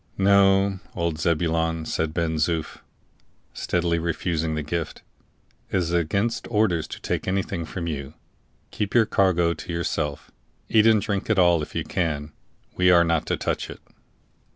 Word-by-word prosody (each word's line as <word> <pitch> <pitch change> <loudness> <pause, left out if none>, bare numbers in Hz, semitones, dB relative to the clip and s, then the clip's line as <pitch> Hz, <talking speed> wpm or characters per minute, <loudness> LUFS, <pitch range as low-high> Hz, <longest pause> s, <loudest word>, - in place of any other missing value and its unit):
"No, 95 0 +4 0.2
old 85 -3 -2
Zebulon," 80 -1 0
said 80 0 -1
Ben 80 -1 -1
Zoof, 80 0 -1 0.7
steadily 85 -1 0
refusing 80 -1 -1
the 75 - -2
gift, 80 +2 -4 0.7
"it - - 0
is 85 -2 -1
against 100 +8 0
orders 105 -8 +1
to - - -8
take - - -3
anything 95 -3 -1
from 85 +1 -5
you. 75 -2 -5 0.6
Keep 105 +1 -3
your 115 -2 +6
cargo 85 -5 +2
to 85 - -8
yourself; 75 -3 -3 0.4
eat 110 0 +4
and 110 -2 +4
drink 100 0 -2
it 110 - +2
all 85 -3 +4
if 75 - -7
you - - -1
can; 75 -4 -2 0.4
we 90 0 +4
are 85 -1 +6
not 85 -2 0
to - - 0
touch - - -2
it." - - -9
85 Hz, 155 wpm, -24 LUFS, 80-95 Hz, 0.7 s, your